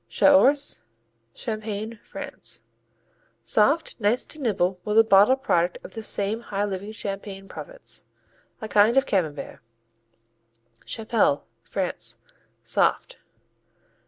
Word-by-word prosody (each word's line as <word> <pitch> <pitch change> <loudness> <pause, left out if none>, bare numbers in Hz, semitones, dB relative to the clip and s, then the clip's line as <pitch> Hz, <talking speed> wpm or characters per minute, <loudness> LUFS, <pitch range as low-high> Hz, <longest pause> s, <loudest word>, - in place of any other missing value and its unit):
Chaource 285 0 +4 0.5
Champagne, 215 0 -4
France - - -5 0.8
Soft, 285 +10 +2
nice 225 +4 +2
to 310 - -4
nibble 190 -6 0
with 210 - -1
the 225 - +9
bottled 220 +6 +5
product 175 -4 +2
of - - -11
this 225 -2 -6
same 205 +2 0
high 205 -3 -2
living 200 +1 -4
Champagne 195 -2 -6
Province. - - -8 0.6
A 220 - -4
kind 215 +4 +4
of 270 - +5
Camembert. 160 - -2 1.3
Chapelle 220 -10 +1 0.2
France - - -4 0.5
Soft. - - +1
215 Hz, 105 wpm, -25 LUFS, 195-235 Hz, 1.3 s, the